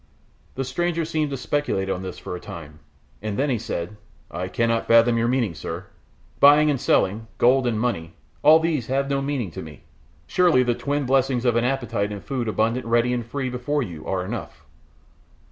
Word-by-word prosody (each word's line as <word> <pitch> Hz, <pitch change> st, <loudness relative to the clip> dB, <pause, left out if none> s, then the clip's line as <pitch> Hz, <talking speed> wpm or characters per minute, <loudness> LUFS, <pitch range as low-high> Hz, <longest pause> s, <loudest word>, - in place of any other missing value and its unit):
The 135 Hz, -, -2 dB
stranger 165 Hz, +5 st, -1 dB
seemed 155 Hz, -2 st, -1 dB
to 135 Hz, -, -3 dB
speculate 130 Hz, -8 st, -1 dB
on 95 Hz, -1 st, -2 dB
this 95 Hz, -1 st, -6 dB
for -, -, -6 dB
a -, -, -6 dB
time, 75 Hz, -3 st, -10 dB, 0.4 s
and 105 Hz, -1 st, -3 dB
then 140 Hz, +1 st, +1 dB
he 120 Hz, -, 0 dB
said, 105 Hz, -2 st, -5 dB, 0.3 s
"I 90 Hz, +1 st, -3 dB
cannot 115 Hz, +3 st, 0 dB
fathom 115 Hz, +1 st, +5 dB
your 115 Hz, 0 st, +1 dB
meaning, 120 Hz, -7 st, +1 dB
sir. 85 Hz, +3 st, -6 dB, 0.5 s
Buying 150 Hz, +1 st, +7 dB
and 135 Hz, -, -2 dB
selling, 110 Hz, +4 st, +1 dB
gold 125 Hz, +1 st, +4 dB
and 110 Hz, -3 st, 0 dB
money, 85 Hz, -9 st, -2 dB, 0.3 s
all 155 Hz, +2 st, +7 dB
these 160 Hz, -7 st, -1 dB
have 140 Hz, +1 st, 0 dB
no 140 Hz, 0 st, +1 dB
meaning 135 Hz, -9 st, -2 dB
to -, -, -7 dB
me. 75 Hz, -3 st, -11 dB, 0.4 s
Surely 170 Hz, -, +3 dB
the 120 Hz, -1 st, +1 dB
twin 140 Hz, +4 st, -2 dB
blessings 130 Hz, -1 st, +1 dB
of 120 Hz, -2 st, +3 dB
an 120 Hz, +1 st, +2 dB
appetite 120 Hz, -6 st, -1 dB
and 100 Hz, -1 st, -7 dB
food 130 Hz, -4 st, -3 dB
abundant 115 Hz, +3 st, 0 dB
ready 120 Hz, +1 st, +2 dB
and 120 Hz, -1 st, -1 dB
free 130 Hz, +3 st, -4 dB
before 140 Hz, +4 st, -1 dB
you 85 Hz, -8 st, -8 dB
are 90 Hz, -1 st, -1 dB
enough." 115 Hz, +4 st, -7 dB
120 Hz, 195 wpm, -23 LUFS, 105-135 Hz, 0.5 s, Buying